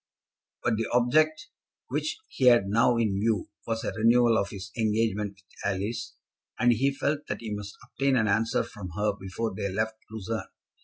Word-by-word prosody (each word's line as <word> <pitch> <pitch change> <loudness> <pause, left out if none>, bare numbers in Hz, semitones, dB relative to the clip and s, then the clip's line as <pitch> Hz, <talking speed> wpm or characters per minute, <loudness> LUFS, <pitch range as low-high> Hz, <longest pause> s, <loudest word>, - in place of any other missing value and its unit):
But 115 -2 +2
the 115 - -1
object 155 +9 +3 0.4
which 310 - -1
he 130 - -1
had 120 -5 +7
now 115 +4 +3
in 105 -4 +1
view 110 -2 0 0.2
was 115 0 -1
a - - -1
renewal 115 +3 +4
of 100 -2 +1
his 95 -2 -8
engagement 105 -2 0
with 95 - -24 0.3
Alice, 110 +4 -4 0.4
and 120 0 +4
he 135 +5 +2
felt 145 +2 -2
that - - -4
he 110 -2 -4
must 105 -1 -6
obtain 135 -1 0
an 110 -4 +3
answer 110 +3 +2
from 100 -5 -8
her 105 0 +1
before 100 +2 -4
they 100 +1 -3
left 110 +3 -1
Lucerne. 110 0 -4
110 Hz, 175 wpm, -28 LUFS, 105-120 Hz, 0.4 s, had